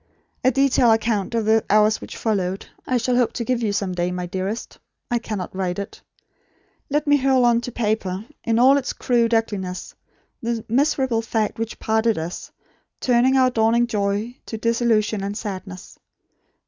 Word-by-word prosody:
A 255 - +5
detailed 260 -3 +4
account 225 -1 -1
of 225 -2 0
the 220 0 +3
hours 215 +1 +4
which - - -8
followed, 195 -4 -1 0.2
I 255 - +2
shall 245 +1 0
hope 245 -2 +2
to 240 - -3
give 250 0 -1
you 215 -3 0
some 200 -2 -1
day, 175 0 -1
my 180 0 -3
dearest. 190 +5 -4 0.3
I 240 - +2
cannot 210 -6 -5
write 185 -2 -2
it. 200 - -6 0.9
Let 295 +2 0
me 290 -1 +4
hurl 260 -2 +3
on 235 -1 +3
to 245 - -6
paper, 210 -4 -2 0.2
in 230 -1 +1
all 265 +4 +6
its 265 - -4
crude 235 -2 +1
ugliness, 195 -5 -2 0.5
the 230 -1 -3
miserable 265 -1 +1
fact 225 -1 -2
which 225 0 -4
parted 220 0 +1
us; 165 +2 -5 0.5
turning 255 +1 +3
our 255 -1 +4
dawning 230 +1 +3
joy 210 +1 -2
to 220 - -5
disillusion 225 -2 +1
and 200 +1 -3
sadness. 190 -3 -7
225 Hz, 170 wpm, -22 LUFS, 200-240 Hz, 0.9 s, all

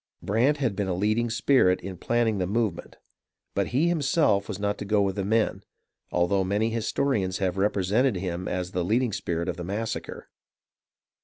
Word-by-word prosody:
Brant 125 +9 +2
had 130 -8 -1
been 100 0 -1
a 90 - -1
leading 110 +5 +1
spirit 115 -5 +3
in 95 0 -6
planning 115 +2 0
the 90 - 0
move 110 -1 +1
ment; - - -12 0.6
but - - 0
he 140 +7 +1
himself 145 - +2
was 105 - -4
not 100 0 -2
to - - -3
go 105 +1 +2
with 95 -1 -1
the 100 - -2
men, 110 +3 +1 0.5
although 90 +3 +2
many 105 +4 0
historians 110 -4 0
have 95 -3 -1
represented 105 +5 +1
him 90 -1 -3
as 90 0 -3
the 90 -2 -1
leading 115 +4 +1
spirit 85 -1 -2
of 90 - -3
the 90 - -5
massacre. 105 +5 -4
105 Hz, 180 wpm, -26 LUFS, 95-115 Hz, 0.6 s, spirit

